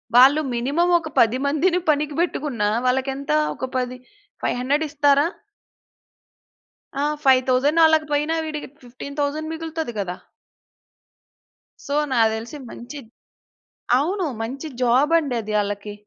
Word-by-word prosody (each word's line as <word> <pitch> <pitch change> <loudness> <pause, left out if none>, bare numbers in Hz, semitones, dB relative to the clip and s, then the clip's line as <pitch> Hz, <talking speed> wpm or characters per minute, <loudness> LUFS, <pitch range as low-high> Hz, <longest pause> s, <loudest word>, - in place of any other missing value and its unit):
వాళ్ళు 270 +5 +7
మినిమమ్ 290 +9 +1
ఒక 315 - -7
10 230 +2 +4
మందిని 340 +5 +2
పనికి 295 0 +1
పెట్టుకున్నా 275 -11 -1 0.2
వాళ్ళకెంత 265 +3 -1 0.2
ఒక - - -4
10, 250 0 -3 0.5
500 280 +5 0
ఇస్తారా? 285 0 +3 1.7
ఆ! - - 0 0.2
5000 265 +4 +4
అలాగ 315 0 +4
పోయినా, 300 +2 +1
వీడికి 300 -1 -5 0.2
15,000 285 +5 -4
మిగులుతది 320 -4 -4
కదా! 180 -2 -4 1.7
సో, 280 - -1 0.2
నాకు 225 -3 +4
తెలిసి 230 +7 -7
మంచిద్ 245 0 -10 0.9
అవును. 365 +5 -1 0.2
మంచి 270 +7 -5
జాబండి 275 +3 +3
అది 215 0 -6
ఆళ్ళకి. 205 0 -5
280 Hz, 110 wpm, -22 LUFS, 250-310 Hz, 1.7 s, వాళ్ళు